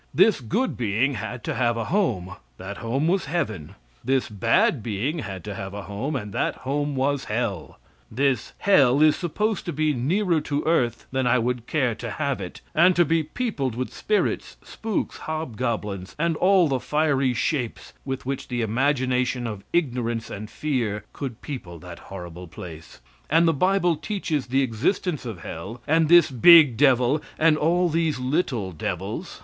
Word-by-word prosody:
This 195 -4 +4
good 230 - -1
being 120 +4 +1
had 115 +1 -5
to - - -2
have 120 -2 +1
a 115 - -1
home; 95 - 0 0.2
that 100 +2 -7
home 130 +6 -1
was 185 +1 +1
heaven. 120 - -3 0.3
This 130 +1 +1
bad 120 - +2
being 120 - -2
had 95 - -6
to 105 - -5
have 95 0 -6
a 100 - -6
home; 110 +10 -4
and 105 -6 -4
that - - 0
home 145 +1 -1
was 135 +1 0
hell. 105 -7 -3 0.3
This 130 -1 0
hell 145 -8 +4
is 155 -1 +5
supposed 210 +5 -1
to - - -1
be 155 0 +1
nearer 165 - +1
to 145 0 -2
earth 120 -8 +1
than 130 -1 0
I 125 +1 +4
would 120 0 -2
care 130 -6 +1
to 115 +2 -6
have 140 -3 -2
it, 90 - -8
and 180 +3 +5
to 175 - +4
be 165 +2 +2
peopled 155 - -3
with 130 +1 -4
spirits, 210 -1 -1
spooks, 220 -2 -3
hobgoblins, 115 - -3
and 165 +1 +1
all 185 -2 +4
the 135 -3 0
fiery 140 -3 +1
shapes 125 0 -2
with 135 -1 -4
which 135 +1 -3
the 120 -2 -2
imagination 125 +1 0
of 105 -4 -5
ignorance 120 -8 -1
and 105 +1 -6
fear 115 -9 -2
could 130 -5 -6
people 100 - -7
that 85 +1 -10
horrible 90 -2 -8
place; 80 -1 -11 0.3
and 165 +3 +4
the 165 - +4
bible 180 +2 +2
teaches 155 -3 -3
the 135 +2 +2
existence 135 - -1
of 105 -7 -7
hell 95 +10 -7
and 160 0 +3
this 170 -4 +7
big 150 0 +8
devil 130 +2 +3 0.2
and 160 -1 +4
all 170 +4 +2
these 165 -2 0
little 125 - -1
devils. 80 - -5
130 Hz, 170 wpm, -24 LUFS, 115-155 Hz, 0.3 s, big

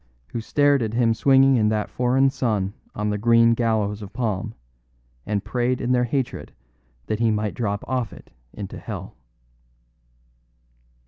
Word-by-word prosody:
who 115 - -3
stared 145 +3 +2
at 110 0 -2
him 115 -2 +3
swinging 135 +2 +4
in 105 -2 +3
that 110 -1 -1
foreign 125 +2 +2
sun 110 -8 -1 0.2
on 105 0 -1
the 105 - -2
green 115 +1 +5
gallows 110 -3 0
of 100 -1 -8
palm, 110 -3 -3 0.7
and 105 -1 -1
prayed 125 +1 -1
in 125 -1 -1
their 125 -1 +3
hatred 130 +1 -3 0.5
that 110 - -2
he 115 -1 +3
might 105 -1 -1
drop 100 -4 -2
off 125 -5 -1
it - - -14 0.2
into 100 -2 -7
hell." - - -7
115 Hz, 150 wpm, -23 LUFS, 105-125 Hz, 0.7 s, green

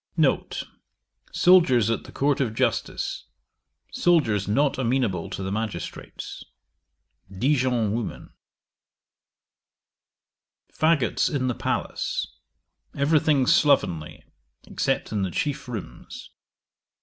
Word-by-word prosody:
N. - - +2 0.8
Soldiers 145 - +5
at 115 - -2
the - - -11
court 140 0 +1
of 115 -5 -1
justice. - - -2 0.6
Soldiers 120 - +2
not 135 +8 +1
amenable 120 -8 0
to 95 - -5
the 95 - -3
magistrates. 105 -4 -5 0.9
Dijon 125 0 +1
woman. 115 -1 -5 2.4
'Faggots 150 - +2
in 140 -4 -1
the 125 - 0
palace. - - -2 0.7
Every 150 +3 +3
thing 140 -4 +2
slovenly, 90 - +2 0.4
except - - -1
in 105 - -1
the 95 - -1
chief 145 - -3
rooms. 105 - -8
125 Hz, 95 wpm, -25 LUFS, 105-145 Hz, 2.4 s, Soldiers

